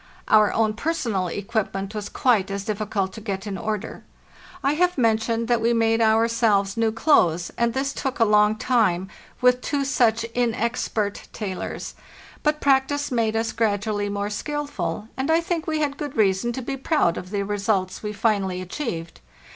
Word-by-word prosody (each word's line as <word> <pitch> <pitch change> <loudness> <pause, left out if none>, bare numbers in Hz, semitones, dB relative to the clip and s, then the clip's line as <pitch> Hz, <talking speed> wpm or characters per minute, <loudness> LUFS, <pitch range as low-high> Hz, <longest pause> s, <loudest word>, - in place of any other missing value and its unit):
Our 215 -1 +5
own 220 -1 +1
personal 230 - -1
equipment 200 0 -3
was 210 -1 -5
quite 220 -7 +2
as 195 0 -4
difficult 210 -3 -2
to 220 - -9
get 195 -2 -4
in 205 -2 -4
order. 215 0 -4 0.6
I 275 +2 +3
have 360 +2 +1
mentioned 230 -1 +1
that 240 -1 +2
we 230 +1 +2
made 225 0 +2
ourselves 220 -3 +3
new 225 -1 +1
clothes, 180 - +2
and 235 0 0
this 275 +1 -1
took 265 -2 -3
a 230 - +5
long 210 0 +4
time, 200 -6 +1 0.3
with 250 0 +4
two 280 0 -1
such 230 -4 +2
inexpert 230 -3 -1
tailors; 195 -4 -5 0.5
but 300 0 +1
practice 280 +1 +2
made 225 -3 +1
us 225 0 0
gradually 205 -1 0
more 200 +1 -2
skilful, 210 - -3
and 265 +3 -2
I 325 +1 +5
think 335 -1 -2
we 310 -1 0
had 285 -1 -1
good 290 -4 -5
reason 200 +2 +2
to 260 - -5
be 270 +3 -3
proud 270 - +1
of 180 - -7
the 200 0 -1
results 195 -2 -1
we 210 - -3
finally 200 -3 0
achieved. 180 - -5
220 Hz, 170 wpm, -24 LUFS, 200-250 Hz, 0.6 s, Our